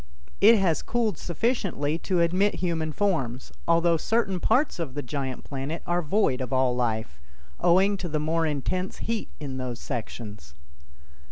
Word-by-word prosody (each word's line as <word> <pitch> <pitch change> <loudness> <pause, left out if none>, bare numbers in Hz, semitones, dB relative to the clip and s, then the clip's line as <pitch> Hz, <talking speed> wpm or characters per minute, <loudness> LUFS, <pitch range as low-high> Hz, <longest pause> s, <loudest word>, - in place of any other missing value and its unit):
It 220 +4 +8
has 180 -5 +2
cooled 225 -7 -1
sufficiently 175 - -1
to 180 -2 +1
admit 185 +5 +2
human 165 -3 -1
forms, 135 - -1 0.2
although 170 0 +4
certain 195 +1 0
parts 250 - +2
of 150 -6 -4
the 145 - -3
giant 135 -1 -4
planet 140 +4 -5
are 175 0 +1
void 155 -5 +1
of 130 - -4
all 130 -1 +2
life, 110 - -1 0.4
owing 190 +4 +4
to 180 -2 -4
the 155 0 0
more 160 +2 +1
intense 180 +6 -2
heat 225 -1 -3
in 135 -4 -5
those 125 -2 -4
sections. 110 - -6
165 Hz, 155 wpm, -26 LUFS, 130-185 Hz, 0.4 s, It